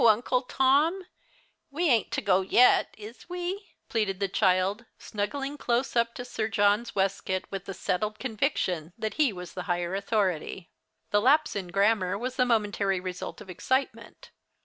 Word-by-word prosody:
Uncle 235 +3 +4
Tom. 290 +8 +2 0.6
We 330 +5 0
ain't 235 -7 +3
to - - 0
go 190 -2 +3
yet, 235 +6 +4
is 220 +9 -11
we?" 360 +3 -5
pleaded 205 -4 -1
the 200 - +1
child, 190 +3 +1
snuggling 275 +7 -4
close 245 +2 0
up 235 0 +1
to 245 - -6
Sir 225 -3 -2
John's 210 +1 +1
waistcoat, 190 -1 0
with 195 -1 -6
a 195 - -4
settled 210 +4 -2
conviction 205 - -1
that 220 -1 -3
he 280 -6 +4
was 180 -2 -9
the 180 - -5
higher 175 0 -1
authority. 195 -4 -1 0.4
The 205 - +3
lapse 295 +5 +3
in 195 -3 -3
grammar 200 0 +2
was 250 +4 -4
the 250 - +3
momentary 205 -4 +1
result 180 +3 -6
of 200 - -12
excitement. 260 +9 -3
215 Hz, 160 wpm, -27 LUFS, 190-250 Hz, 0.6 s, Uncle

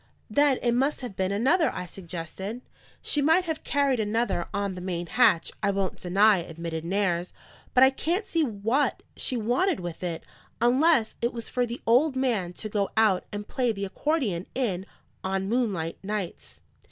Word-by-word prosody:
"Then 285 +3 +4
it 240 - +3
must 270 +5 +1
have 240 -6 -6
been 190 0 0
another," 260 - +3
I 180 - -5
suggested. 185 +5 -6 0.4
"She 295 - +1
might 325 +5 +4
have 320 -2 -3
carried 280 -3 +1
another 220 -4 0
on 200 -1 -1
the 180 - -7
main 175 -2 -3
hatch, 165 0 +3
I 200 - +2
won't 195 -1 -1
deny," 200 +3 +4
admitted 165 -1 -5
Nares; 180 -1 0 0.4
"but 255 - +7
I 265 - +7
can't 345 - -1
see 330 - 0
what 230 +3 0
she 255 - -1
wanted 250 - +1
with 175 -2 -6
it, 170 -3 -3 0.4
unless 250 +1 +3
it 235 +1 0
was 230 -1 -5
for 245 -1 0
the 235 +1 -6
old 260 +5 +4
man 235 -9 0
to 215 - -6
go 205 -2 -1
out 210 -5 +3
and 205 0 -5
play 250 -3 0
the 200 -2 -3
accordion 205 - -1
in, 200 -8 -1 0.4
on 190 0 -1
moonlight 200 -8 -1
nights." 205 -3 -5
215 Hz, 175 wpm, -27 LUFS, 185-255 Hz, 0.4 s, but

